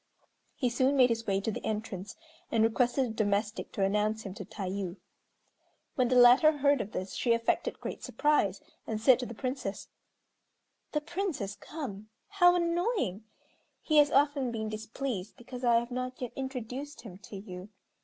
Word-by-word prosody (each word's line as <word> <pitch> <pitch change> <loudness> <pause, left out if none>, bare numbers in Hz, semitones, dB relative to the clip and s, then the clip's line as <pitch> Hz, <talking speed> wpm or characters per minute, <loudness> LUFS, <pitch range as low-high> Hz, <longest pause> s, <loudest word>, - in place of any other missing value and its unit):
He 255 - 0
soon 260 +3 +2
made 250 -1 +6
his 230 0 -2
way 195 -1 +2
to 220 - -1
the - - -6
entrance, 210 -3 -4 0.4
and 225 -1 +3
requested 245 +3 +2
a - - -4
domestic 210 0 -1
to 200 - 0
announce 210 +2 +1
him 195 - -6
to 195 - -7
Tayû. 190 -1 -4 1.0
When 255 -4 +2
the 255 - +1
latter 250 +5 +7
heard 285 -2 +3
of 215 - -6
this 185 +1 -4
she 235 - +2
affected 230 0 0
great - - -6
surprise, 290 -11 +1 0.2
and 220 -1 -2
said 240 +2 +5
to 250 - -3
the 235 - -8
Princess, 255 -5 -4 1.0
"The 300 - +1
Prince 350 +1 -2
has 200 -1 -4
come. 215 -10 -7 0.2
How 355 -3 +5
annoying! 340 - 0 0.5
He 310 - +1
has 295 -1 +7
often 280 -2 +2
been 220 -2 -3
displeased 220 -1 -5
because 250 0 -9
I 240 -1 +4
have 235 +1 +1
not 255 +1 -4
yet 250 -2 -4
introduced 265 +2 -5
him 190 -5 -11
to 205 - -11
you. 190 -1 -8
235 Hz, 175 wpm, -30 LUFS, 210-275 Hz, 1.0 s, latter